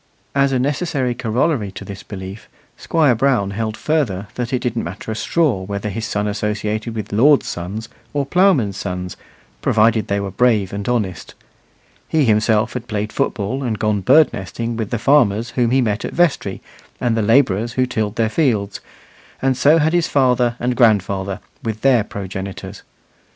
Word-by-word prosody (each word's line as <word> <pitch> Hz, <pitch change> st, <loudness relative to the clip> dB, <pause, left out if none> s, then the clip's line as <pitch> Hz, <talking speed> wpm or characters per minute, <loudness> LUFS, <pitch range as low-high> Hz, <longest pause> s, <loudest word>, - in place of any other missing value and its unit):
As 140 Hz, 0 st, +2 dB
a 130 Hz, -, +1 dB
necessary 135 Hz, -1 st, -1 dB
corollary 120 Hz, -1 st, 0 dB
to -, -, -8 dB
this 100 Hz, -1 st, -8 dB
belief, 95 Hz, +1 st, -9 dB, 0.3 s
Squire 155 Hz, -6 st, +2 dB
Brown 120 Hz, -5 st, +1 dB
held 110 Hz, +1 st, -3 dB
further 125 Hz, -12 st, -1 dB
that 125 Hz, -1 st, -4 dB
it 130 Hz, -, +2 dB
didn't 120 Hz, -2 st, -2 dB
matter 95 Hz, +6 st, -6 dB
a -, -, -3 dB
straw 140 Hz, -, +1 dB
whether 100 Hz, +2 st, -4 dB
his 110 Hz, +2 st, -4 dB
son 105 Hz, 0 st, -1 dB
associated 105 Hz, +2 st, -2 dB
with 105 Hz, -2 st, -5 dB
lords' 140 Hz, +7 st, +5 dB
sons 100 Hz, +6 st, -5 dB, 0.2 s
or 145 Hz, -1 st, -1 dB
ploughmen's 140 Hz, -, +2 dB
sons, 90 Hz, -1 st, -4 dB, 0.5 s
provided 110 Hz, -1 st, +3 dB
they 100 Hz, 0 st, 0 dB
were 100 Hz, -1 st, -4 dB
brave 105 Hz, -3 st, +2 dB
and 100 Hz, +3 st, -3 dB
honest. 105 Hz, -8 st, -2 dB, 0.7 s
He 155 Hz, -3 st, +2 dB
himself 110 Hz, 0 st, +2 dB
had 125 Hz, -1 st, -5 dB
played 105 Hz, -2 st, -3 dB
football 125 Hz, -1 st, -1 dB
and 115 Hz, -4 st, -1 dB
gone 105 Hz, -1 st, 0 dB
bird 140 Hz, +10 st, +5 dB
nesting 115 Hz, +5 st, -4 dB
with 110 Hz, -2 st, -3 dB
the 120 Hz, -, -1 dB
farmers 115 Hz, -2 st, +3 dB
whom 120 Hz, -2 st, +1 dB
he 130 Hz, +2 st, +3 dB
met 105 Hz, -3 st, -1 dB
at -, -, -5 dB
vestry 175 Hz, -3 st, 0 dB, 0.4 s
and 120 Hz, -2 st, +1 dB
the 115 Hz, -, +1 dB
labourers 115 Hz, -1 st, +2 dB
who 130 Hz, -, +2 dB
tilled 110 Hz, -4 st, -2 dB
their 115 Hz, -, +1 dB
fields, 110 Hz, -8 st, 0 dB, 0.6 s
and 135 Hz, 0 st, +1 dB
so 145 Hz, +5 st, +5 dB
had 160 Hz, +1 st, +2 dB
his 175 Hz, -1 st, +2 dB
father 125 Hz, -3 st, +2 dB
and 125 Hz, +1 st, -1 dB
grandfather, 100 Hz, -4 st, +2 dB, 0.2 s
with 110 Hz, -1 st, -4 dB
their 130 Hz, -5 st, +4 dB
progenitors. 95 Hz, 0 st, -7 dB
115 Hz, 170 wpm, -19 LUFS, 100-130 Hz, 0.7 s, lords